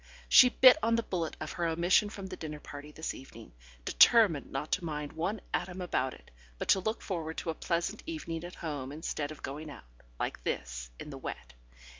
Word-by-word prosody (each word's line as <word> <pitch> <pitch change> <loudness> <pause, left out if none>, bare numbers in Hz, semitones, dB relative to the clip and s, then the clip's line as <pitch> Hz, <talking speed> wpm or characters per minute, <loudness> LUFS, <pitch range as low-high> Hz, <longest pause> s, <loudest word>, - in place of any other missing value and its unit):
She 250 - +9
bit 255 +2 +8
on 230 0 +3
the 230 - +1
bullet 170 -6 -3
of 155 - -5
her 170 -1 -1
omission 175 +5 +3
from 200 -2 -7
the 185 -1 -6
dinner 150 -3 -6
party 145 +1 -9
this 160 +2 -4
evening, 115 - -12 0.3
determining 210 -11 +5
not 135 +3 -4
to - - +1
mind 150 -3 -4
one 185 +6 -2
atom 180 +1 -2
about 130 -7 -1
it, - - -19 0.3
but - - -5
to 190 - +6
look 215 +4 -2
forward 165 -4 -4
to 165 - -2
a - - -4
pleasant 170 +6 -2
evening 170 - -4
at 175 +1 -8
home 145 -5 -4
instead 150 -1 -3
of 155 - -10
going 150 +3 -5
out 140 - -11 0.3
(like - - -3
this) - - -3
in - - -7
the - - -7
wet. - - -7
165 Hz, 205 wpm, -31 LUFS, 145-190 Hz, 0.3 s, She